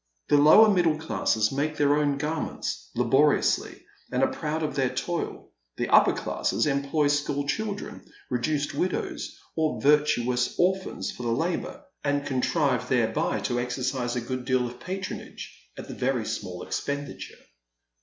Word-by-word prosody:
The 145 - +5
lower 155 +10 +8
middle 175 -6 +3
classes 110 -8 0
make 150 +3 -1
their 145 0 +3
own 145 -2 +1
garments, 150 - -3
laboriously, 135 +5 +2 0.3
and - - +1
are - - +2
proud 155 +1 -3
of 155 - -2
their 135 -2 +1
toil; 175 +5 -4 0.3
the - - -2
upper - - +6
classes - - -1
employ 140 +1 +1
school 145 -1 0
children, 205 +5 -3 0.3
reduced 145 +4 -1
widows, 185 - -3 0.2
or 160 -1 0
virtuous 125 -4 +2
orphans 190 +1 0
for - - -10
the 120 - -2
labour, 170 - -2 0.2
and 145 0 0
contrive 135 0 0
thereby 120 -4 +1
to 120 -1 -1
exercise 125 0 -2
a 125 - -1
good 130 +2 -4
deal 130 -1 +2
of 120 0 -7
patronage 190 +1 -6 0.2
at - - -8
a - - -7
very 125 -3 -1
small 90 -4 -5
expenditure. 140 -1 -5
145 Hz, 145 wpm, -26 LUFS, 125-155 Hz, 0.3 s, lower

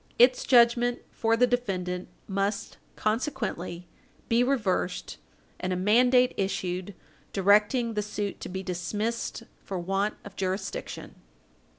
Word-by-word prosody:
Its 250 +1 +5
judgment 240 0 +5
for 225 0 +1
the 250 - +6
defendant 185 -7 -2 0.2
must, 200 +1 -2 0.2
consequently, 215 - -2 0.4
be 235 +1 +4
reversed, 210 -8 -1 0.4
and 185 - -2
a - - +1
mandate 245 +6 +4
issued 185 -1 -2 0.4
directing 210 +5 +3
the 210 - 0
suit 205 -1 -4
to - - -6
be 190 +1 -4
dismissed 210 +7 -3 0.2
for 195 - -4
want 195 +4 -1
of 200 - -10
jurisdiction. 190 +1 -4
205 Hz, 115 wpm, -28 LUFS, 185-235 Hz, 0.4 s, the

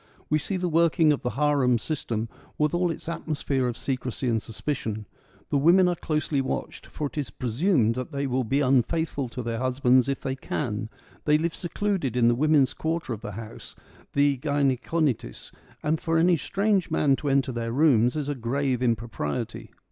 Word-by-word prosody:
We 155 - +4
see 190 +5 -2
the 180 0 -1
working 165 -1 +4
of 145 - -3
the 125 - -1
harem 140 -4 +3
system, 115 -4 -3 0.3
with 150 -1 +1
all 175 0 +2
its 165 - -5
atmosphere 150 -5 -1
of 120 - -3
secrecy 130 -1 -3
and 115 -2 +1
suspicion. 110 -2 -4 0.5
The 145 - +3
women 175 +5 +5
are 175 - +2
closely 150 -3 -1
watched; 130 - -4
for 150 - -4
it 145 - -4
is 140 - -3
presumed 125 - +1
that 130 +5 -5
they 140 -1 -2
will 130 -1 0
be 135 +5 +1
un 130 -1 +5
faithful 145 -1 -2
to 125 +1 -6
their 115 -1 -3
husbands 130 0 +3
if 135 - -2
they 130 - -2
can: 120 -4 -3 0.4
they 150 0 +5
live 165 +1 -1
secluded 180 -7 -2
in 120 -1 +5
the - - +4
women's 145 +1 +3
quarter 160 -5 -2
of 110 - -7
the 105 -3 -6
house 110 +1 -9 0.2
— - - -26
the 140 -2 +3
gynaeconitis 140 - -1 0.2
— - - -27
and 155 +1 0
for 165 -1 +1
any 175 +2 +4
strange 195 +3 0
man 140 -2 +3
to 145 - -2
enter 135 -1 +2
their 115 -1 -3
rooms 125 -3 +4
is 150 -2 -2
a 145 - 0
grave 130 +1 -1
impropriety. 115 - -2
140 Hz, 195 wpm, -26 LUFS, 125-155 Hz, 0.5 s, women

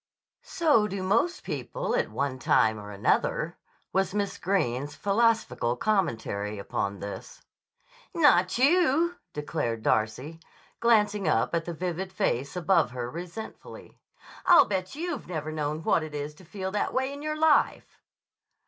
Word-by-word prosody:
"So 290 -11 +2
do 195 -2 -4
most 230 - +1
people - - -3
at - - 0
one 140 -2 -2
time 110 -3 +3
or 105 0 -9
another," 100 -1 0 0.3
was 190 +1 +1
Miss 200 -1 -2
Greene's 145 -7 -1
philosophical 205 - +1
commentary 115 - -1
upon 100 0 -3
this. 100 0 -8 0.7
"Not 230 - +4
you," 330 +4 +3 0.2
declared 145 -7 -3
Darcy, 120 +9 0 0.4
glancing 210 -4 +3
up 115 -3 +1
at 165 -1 0
the 170 - -4
vivid 180 +2 -3
face 140 -3 -1
above 180 -4 +2
her 125 -1 -5
resentfully. 175 +6 -9 0.5
"I'll 355 -2 +8
bet 190 +3 -3
you've 345 +3 -4
never 155 -3 -4
known 155 0 -3
what 165 - +3
it 155 -1 -7
is 145 +1 -4
to 180 +5 -17
feel 190 +2 -5
that 205 - -1
way 265 +1 0
in 285 - -8
your 305 0 -3
life." 315 -1 +2
180 Hz, 140 wpm, -27 LUFS, 140-225 Hz, 0.7 s, I'll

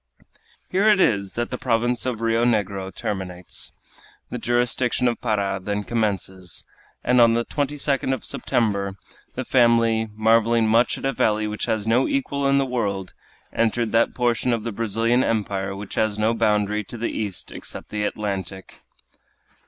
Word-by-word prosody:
Here 200 +4 +4
it 210 -2 +5
is 100 - +2
that 120 0 -3
the 125 - -4
province 120 +1 0
of 115 -3 -2
Rio 115 0 +2
Negro 100 -5 0
terminates. 90 -3 -4 0.6
The - - -3
jurisdiction 120 +1 +1
of 120 - -1
Para 100 -4 0
then 105 +2 -2
commences; 95 -5 -1 0.4
and 125 0 +4
on 115 -1 +6
the 120 0 0
22d 145 -2 -1
of 130 - -2
September 100 -4 -1 0.4
the - - -3
family, 115 -2 +3
marveling 115 +1 +3
much 115 +3 +3
at - - -6
a 135 - +1
valley 110 -2 +1
which 105 0 -3
has 110 -3 -1
no 115 +4 +3
equal 145 - 0
in 140 0 +4
the 135 - +2
world, 100 -7 -2 0.4
entered 115 0 +1
that 115 +1 +2
portion 120 0 +1
of 115 -2 -2
the 115 - -3
Brazilian 115 +3 +1
empire 100 -3 -1
which 100 0 -8
has 110 -2 0
no 110 +2 +2
boundary 105 -2 +1
to 120 - -8
the 115 - -2
east 105 -4 -4
except - - -7
the 105 0 -2
Atlantic. 95 -3 -4
115 Hz, 160 wpm, -23 LUFS, 105-120 Hz, 0.6 s, on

